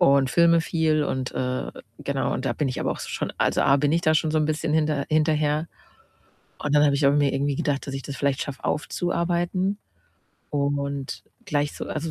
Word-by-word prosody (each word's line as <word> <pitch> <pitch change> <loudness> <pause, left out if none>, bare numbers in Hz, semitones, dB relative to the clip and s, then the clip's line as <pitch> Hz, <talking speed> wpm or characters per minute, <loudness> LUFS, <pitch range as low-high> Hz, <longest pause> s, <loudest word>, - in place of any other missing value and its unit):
und 135 -1 +4
filme 170 +1 +5
viel 160 -2 +1
und, 130 -2 -2
äh, 130 0 -2 0.3
genau - - -1
und - - -3
da - - +1
bin 145 - -1
ich 130 - -3
aber - - 0
auch - - -3
so - - -6
schon - - -3
also, - - +2
A: 135 - +5
Bin 145 +1 +1
ich 165 - +3
da 155 -2 +3
schon 155 0 +2
so 155 - +2
'n 155 - +2
bisschen 155 0 -1
hinter 150 -2 +1
hinterher 155 0 +1 0.9
und 145 0 -1
dann 145 0 +6
habe 145 -1 +3
ich 140 0 +2
aber 140 +1 +4
mir 145 -2 +3
irgendwie 140 0 0
gedacht, 140 -1 -1
dass 140 - -5
ich 135 - -4
das 140 +1 -6
vielleicht 140 -1 0
schaffe 140 -2 -7
aufzuarbeiten 175 +4 -1 0.7
und 140 -1 -2 0.2
gleich 145 0 0
so - - -6
also, 160 +2 -3
150 Hz, 215 wpm, -25 LUFS, 140-155 Hz, 0.9 s, dann